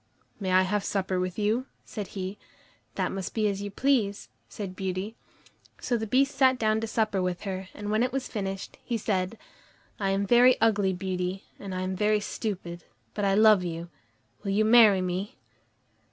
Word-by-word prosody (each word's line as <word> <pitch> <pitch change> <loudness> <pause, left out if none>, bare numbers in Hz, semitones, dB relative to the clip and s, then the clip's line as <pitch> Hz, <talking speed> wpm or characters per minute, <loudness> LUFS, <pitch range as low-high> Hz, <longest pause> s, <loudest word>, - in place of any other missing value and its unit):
"May 190 -3 -2
I 185 0 +5
have 205 +2 0
supper 190 -2 -1
with 185 -1 -3
you?" 220 +5 0 0.2
said 205 -3 -6
he. 190 +2 -4 0.6
"That - - -1
must 190 -2 -5
be 215 -2 +2
as 200 -1 -2
you 205 - -4
please," 215 -3 0 0.2
said 195 -3 -6
Beauty. 190 +3 -3 0.6
So 245 - -1
the 220 -1 -2
Beast 275 +5 +2
sat 260 -1 +4
down 220 -1 +1
to 225 - -2
supper 215 -3 0
with 180 -1 -2
her, 190 -2 -4
and 205 0 -4
when 215 +1 +2
it 250 +1 +1
was 265 0 -2
finished, 195 -3 -5
he 235 - -2
said: 200 0 -1 0.6
"I 195 -2 0
am 195 +1 +1
very 245 +3 +6
ugly, 210 -4 +3
Beauty, 185 +1 -3 0.2
and 195 -2 -6
I 185 - -2
am 185 0 -2
very 210 +2 +2
stupid, 180 -5 -5 0.3
but 205 - -1
I 195 0 +3
love 215 -3 +6
you; 170 0 -5 0.5
will 200 - -4
you 210 +2 +2
marry 220 -4 +7
me?" 185 +3 -3
200 Hz, 185 wpm, -27 LUFS, 185-220 Hz, 0.6 s, marry